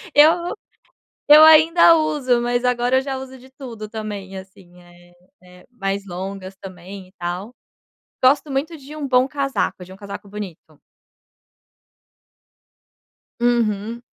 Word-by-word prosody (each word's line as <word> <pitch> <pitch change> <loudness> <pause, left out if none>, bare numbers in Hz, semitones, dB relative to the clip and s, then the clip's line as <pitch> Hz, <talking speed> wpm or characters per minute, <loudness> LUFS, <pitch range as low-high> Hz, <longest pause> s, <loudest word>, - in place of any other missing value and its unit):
eu 325 +4 +4 0.8
eu 300 +1 +9
ainda 325 +2 +7
uso, 270 -6 0
mas 245 +1 -1
agora 250 +1 +1
eu - - +1
já 270 -1 -4
uso 260 0 -9
de 260 +1 -18
tudo 235 -6 -9
também, 205 -3 -7
assim, 185 -2 -14
eh 175 0 -20 0.3
eh, 180 0 -18
mais 195 -4 -4
longas 190 +1 -7
também, 185 0 -11
e - - -26
tal. 180 +7 -5 0.7
Gosto 285 +3 +3
muito 300 +5 -3
de 285 +2 -12
um 290 -2 -5
bom 255 0 +3
casaco, 275 -9 -3
um - - -11
casaco 200 0 -9
bonito. 180 -7 -10 2.6
Uhum. 235 -1 0
235 Hz, 125 wpm, -20 LUFS, 190-270 Hz, 2.6 s, eu